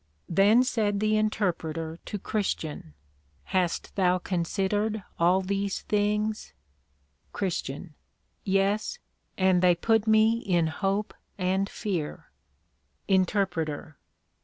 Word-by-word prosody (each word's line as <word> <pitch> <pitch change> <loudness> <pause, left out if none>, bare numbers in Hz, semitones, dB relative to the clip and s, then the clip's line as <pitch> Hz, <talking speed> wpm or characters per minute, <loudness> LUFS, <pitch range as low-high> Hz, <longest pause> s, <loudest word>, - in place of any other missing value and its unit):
Then 205 +8 +5
said 215 -5 0
the 215 +1 +2
Interpreter 165 -7 -1
to 210 - -4
Christian, 160 - -3 0.5
Hast 180 -3 -1
thou 185 -2 +3
considered 195 +4 -1 0.2
all 180 +3 +4
these 195 +1 -2
things? 210 +1 -1 0.8
CHR. 175 -4 -3 0.5
Yes, 200 - +1 0.4
and 185 -2 +3
they 180 -1 +5
put 225 +4 +1
me 220 +1 +4
in 175 -7 +1
hope 195 +6 -1 0.2
and 190 +1 0
fear. 180 -9 -4 0.8
INTER. 175 -7 0
195 Hz, 95 wpm, -27 LUFS, 175-210 Hz, 0.8 s, Then